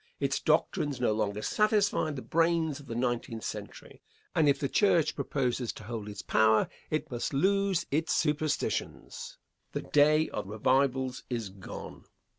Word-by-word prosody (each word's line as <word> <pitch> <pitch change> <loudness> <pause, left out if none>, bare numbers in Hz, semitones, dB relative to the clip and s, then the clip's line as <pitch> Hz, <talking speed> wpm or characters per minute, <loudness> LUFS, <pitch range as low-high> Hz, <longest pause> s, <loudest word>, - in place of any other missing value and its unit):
Its - - 0
doctrines 145 -4 +1
no 120 -3 +2
longer 105 -1 -1
satisfy 210 -6 +2
the 140 -4 -5
brains 165 -3 +1
of 140 - -14
the 115 - -5
nineteenth 120 -2 -2
century; - - -7 0.3
and 150 -2 +4
if 140 - +3
the 140 - 0
church 170 -1 +3
proposes 125 -3 -1
to - - -11
hold 110 -1 -5
its 105 -1 -7
power, 110 0 +4 0.2
it 155 -3 -2
must 120 +3 -3
lose 195 +2 +2
its 160 +3 0
superstitions. 155 - -1 0.4
The - - -3
day 155 +2 +4
of 105 - -4
revivals 130 +4 +1
is 115 -5 -3
gone. 95 0 -9
140 Hz, 150 wpm, -30 LUFS, 115-160 Hz, 0.4 s, and